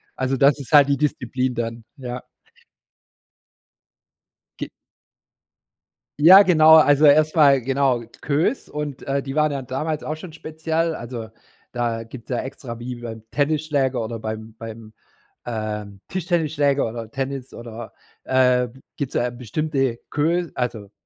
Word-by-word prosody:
Also 130 +1 -1
das 140 +2 +4
ist 135 - -9
halt 145 -1 +7
die 140 - +2
Disziplin 130 -3 -1
dann, 115 0 -4
ja. 125 -2 -6 2.4
Ge - - -4 1.5
ja, 185 +6 +9
genau, 160 -4 +7
also 150 -1 +6
erstmal 150 -2 +5
genau, 135 -1 +1 0.2
Queues 150 - 0
und, 150 -3 -5
äh, 140 0 -1
die 135 0 -6
waren 155 0 +3
ja 140 - -3
damals 145 +4 -3
auch 155 - -3
schon 160 0 -10
speziell, 160 +1 -2
also 115 -2 -7 0.4
da 120 -2 -2
gibt's 115 +1 -12
ja 125 - -1
extra 125 -2 -7
wie 125 +1 -5
beim 115 -2 -8
Tennisschläger 145 -3 0
oder 115 +1 -5
beim 110 0 -6
beim, 110 -1 -9 0.5
ähm, 105 -3 -5
Tischtennisschläger 155 -7 +1
oder 115 -1 -7
Tennis 135 0 -4
oder 115 -2 -9 0.3
äh, 125 -1 +3 0.3
gibt's 140 -3 -3
da 125 - +1
bestimmte, 130 +1 -2
Queue 165 +2 0
also, 110 -5 -3
135 Hz, 130 wpm, -22 LUFS, 120-150 Hz, 2.4 s, ja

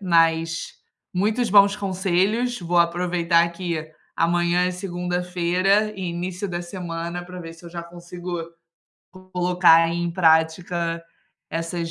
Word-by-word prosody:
mas 165 -2 +1 0.4
muitos 215 +6 +1
bons 200 0 +6
conselhos, 195 +5 0
vou 175 0 -2
aproveitar, 170 0 +2
que 170 -3 -4 0.2
amanhã 175 +1 +2
é - - 0
segunda-feira 180 +2 0
e 190 - -6
início 180 +3 -4
da 175 -1 -3
semana 175 -1 -5
pra 180 0 -9
ver 165 -1 -8
se 165 - -18
eu 170 - -9
já 170 -1 -6
consigo 175 0 -7 0.7
co 185 0 -17
colocar 175 -2 +4
em 175 0 -1
prática 165 0 +1 0.5
essas 165 0 -3
175 Hz, 125 wpm, -23 LUFS, 170-185 Hz, 0.7 s, bons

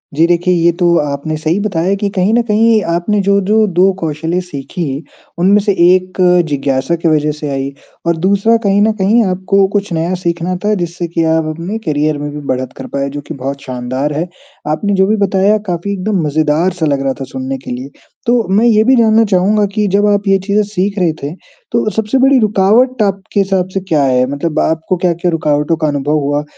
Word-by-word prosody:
जी, 160 +3 +4
देखिए 175 +1 +1
ये 170 -1 +3
तो 175 - +2
आपने 145 +1 -3
सही 160 +5 -1
बताया 195 -2 0
कि 205 - 0
कहीं 190 +3 +2
न 240 - +4
कहीं 220 +1 +3
आपने 205 +5 0
जो-जो 200 +2 +2
2 185 +1 +3
कौशलें 160 +2 -2
सीखीं, 145 -3 -5 0.4
उनमें 195 +4 +4
से 205 0 +1 0.2
1 185 0 +2 0.3
जिज्ञासा 135 +1 -1
की 170 0 -2
वजह 150 -1 +2
से 150 - -4
आई 135 0 -3 0.4
और 170 - +2
दूसरा 200 +6 +2
कहीं 200 0 +2
न 220 - +3
कहीं 220 +5 +3
आपको 190 +1 +1
कुछ 205 -1 -1
नया 165 +3 -1
सीखना 170 +1 -1
था 210 - +2
जिससे 175 -1 -3
कि 165 0 -1
आप 160 -1 0
अपने 175 +7 -4
करियर 150 -1 0
में 145 0 -4
भी 150 - -7
बढ़त 130 0 -2
कर - - -7
पाएँ 140 0 -1
जो 145 +1 -6
कि - - -5
बहुत 140 0 -5
शानदार 130 +3 -3
है। 160 +4 -2 0.4
आपने 200 +7 -1
जो 190 0 +3
भी 215 - +2
बताया 200 +1 +2
काफ़ी 175 +2 -3
एकदम 195 0 -1
मज़ेदार 155 +4 +1
सा 175 -3 -2
लग 140 -2 0
रहा 135 -1 0
था - - -4
सुनने 130 +1 -5
के 130 - -9
लिए। 125 +2 -6 0.4
तो 235 - +2 0.2
मैं 215 +4 +3
ये 215 -2 +4
भी 260 +3 +4
जानना 225 -2 +4
चाहूँगा 205 +2 +2
कि 210 -1 0
जब 200 +2 +2
आप 205 0 +1
ये 195 0 +4
चीज़ें 205 +1 +2
सीख 200 0 -2
रहे 175 -3 +2
थे, 145 +2 -4 0.4
तो 235 -2 +1
सबसे 220 +4 -1
बड़ी 265 0 +4
रुकावट 220 +4 +2
आपके 195 0 -1
हिसाब 190 -2 +1
से 195 - 0
क्या 165 -6 0
है 130 -1 +2
मतलब 150 +2 -2
आपको 160 +3 0
क्या-क्या 175 0 0
रुकावटों 150 -1 0
का 155 -1 0
अनुभव 145 +1 0
हुआ? 145 +1 -1
180 Hz, 210 wpm, -14 LUFS, 150-200 Hz, 0.4 s, जी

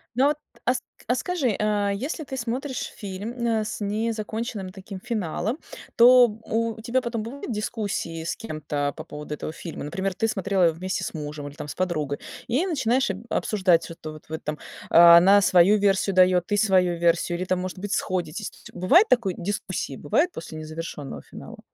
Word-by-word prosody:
Ну 260 +3 +4
вот, 295 - +1 0.3
а 250 - +4
ск 260 - -3 0.3
а 245 - +2
скажи, 265 - 0
а 210 -1 +1
если 275 - -3
ты 270 - -6
смотришь 255 +3 -3
фильм, 200 +2 -5 0.2
э, 225 -2 +1
с 215 - -5
незаконченным 215 -1 -3
таким 190 0 -9
финалом, 215 - -2 0.4
то 245 +1 +8
у 225 +1 -3
тебя 245 +3 0
потом 235 -3 -3
будут 255 +3 -6
дискуссии 210 -7 -3
с 165 - -2
кем-то 150 - -3
по 155 - -7
поводу 150 -1 -7
этого 150 - -5
фильма? 165 +1 -7
Например, 190 +6 -2
ты 225 - 0
смотрела 195 -3 0
его 165 - +3
вместе 185 +3 -3
с - - -4
мужем 150 -2 -6
или 145 - -10
там 150 - -7
с - - -6
подругой, 155 -6 -1 0.3
и 260 +10 +1
начинаешь 265 - +1
об 195 +3 -8
обсуждать, 185 -5 +2
что-то 160 -2 -8
вот 155 - -13
вот 160 0 -5
там: 150 0 -3 0.3
она 170 +4 +8
свою 185 +2 +5
версию 195 -1 +2
дает, 180 -1 +4
ты 205 - +1
свою 185 -4 +3
версию, 170 0 +2
или 185 - -3
там 185 0 0
может 185 +1 -5
быть 205 +1 -3
сходитесь. 185 +2 -2
Ци - - -15
бывает 280 - +5
такое 230 -7 +3
дискуссии, 185 -6 -3
бывает 295 - +1
после 160 - -8
незавершенного 155 - -6
финала? - - -11
195 Hz, 185 wpm, -25 LUFS, 170-230 Hz, 0.4 s, то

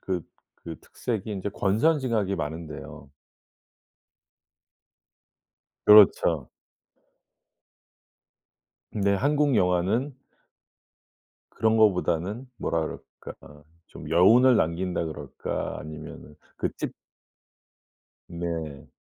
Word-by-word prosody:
그 90 -3 -3 0.4
그 80 -3 -7
특색이 110 -3 -5
인제 100 0 -3
권선징악이 110 -1 +1
많은데요. 75 -2 -7 2.8
그렇죠. 90 -8 +6 2.4
네 100 -1 +1
한국 145 +4 +1
영화는 95 +10 +1 1.4
그런 110 0 +1
거보다는 100 +2 +1
뭐라 80 -1 -1
그럴까 75 -1 -10 0.2
좀 75 - -11
여운을 115 +9 +6
남긴다 85 0 -1
그럴까 80 - -5
아니면은 75 -1 -10 0.2
그 - - -1
찝 - - -4 1.4
네. 85 -5 -5
95 Hz, 165 characters per minute, -26 LUFS, 80-110 Hz, 2.8 s, 그렇죠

